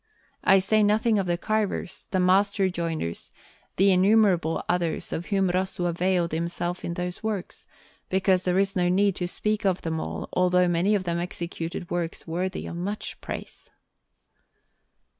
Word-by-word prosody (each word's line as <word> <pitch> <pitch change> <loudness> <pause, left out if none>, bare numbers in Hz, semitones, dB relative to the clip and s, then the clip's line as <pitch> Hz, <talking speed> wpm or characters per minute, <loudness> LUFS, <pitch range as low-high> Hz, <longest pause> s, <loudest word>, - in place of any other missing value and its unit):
I 195 - +6
say 205 +3 +2
nothing 215 +1 +3
of 190 - -1
the 175 0 +1
carvers, 215 -1 -2
the 185 - 0
master 195 +2 +3
joiners, 165 - -3 0.5
and 195 - +4
innumerable 190 -3 +3
others 175 -2 -1
of 170 - -4
whom 195 -3 +1
Rosso 185 0 -1
availed 175 0 +1
himself 170 +2 -3
in 170 - -3
those 180 0 -4
works, 215 -4 -4 0.4
because 190 -1 +2
there 180 0 0
is 195 0 +1
no 180 -1 +2
need 195 +1 +3
to 180 - -2
speak 215 +4 -1
of 190 -2 +1
them 160 -1 -2
all, - - -5
although 180 0 +3
many 175 +5 +2
of 195 - 0
them 170 -1 -1
executed 170 -1 -5
works 170 -1 -3
worthy 180 +3 -3
of 170 - -6
much 200 +4 -5
praise. - - -7
180 Hz, 160 wpm, -26 LUFS, 175-195 Hz, 0.5 s, I